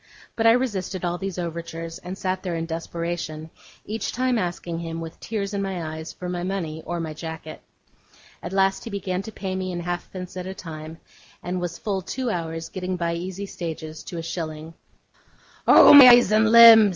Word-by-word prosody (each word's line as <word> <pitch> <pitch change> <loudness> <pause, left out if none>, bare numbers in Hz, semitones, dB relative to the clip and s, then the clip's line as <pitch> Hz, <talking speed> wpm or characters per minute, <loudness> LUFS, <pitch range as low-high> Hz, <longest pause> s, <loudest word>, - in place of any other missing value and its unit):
But 225 0 +2
I 225 - +8
resisted 200 -7 -2
all 175 0 -2
these 195 -2 -4
overtures, 165 -1 -5
and 180 +2 -7
sat 185 -1 -2
there 180 -3 -3
in 165 0 -2
desperation; 165 -1 -5 0.3
each 220 0 -3
time 255 -2 0
asking 175 -2 -3
him, 165 -1 -5
with 165 0 -8
tears 210 -2 -4
in 200 - -1
my 180 -5 -3
eyes, 160 +1 -7
for 180 - -8
my 180 -1 -3
money 175 -4 -3
or 175 0 -2
my 160 -2 -4
jacket. 160 0 -8 0.8
At 175 - -6
last 195 0 +1
he - - -6
began 190 -3 -3
to 220 - -8
pay 190 -2 -4
me 185 0 -3
in 175 -1 -4
halfpence 175 +1 -5
at 180 0 -5
a 190 - -6
time; 160 -2 -8 0.5
and 180 0 -3
was 175 -1 -4
full 195 -3 -2
two 250 +6 -3
hours 165 -2 -4
getting 185 -1 -4
by 170 -1 -1
easy 185 +3 -5
stages 160 -4 -6
to 175 - -7
a 165 - -4
shilling. 160 -1 -5 0.9
'Oh, - - +9
my 280 -3 +12
eyes 240 -4 +7
and 220 +1 +4
limbs! 230 -2 +10
180 Hz, 195 wpm, -24 LUFS, 165-195 Hz, 0.9 s, my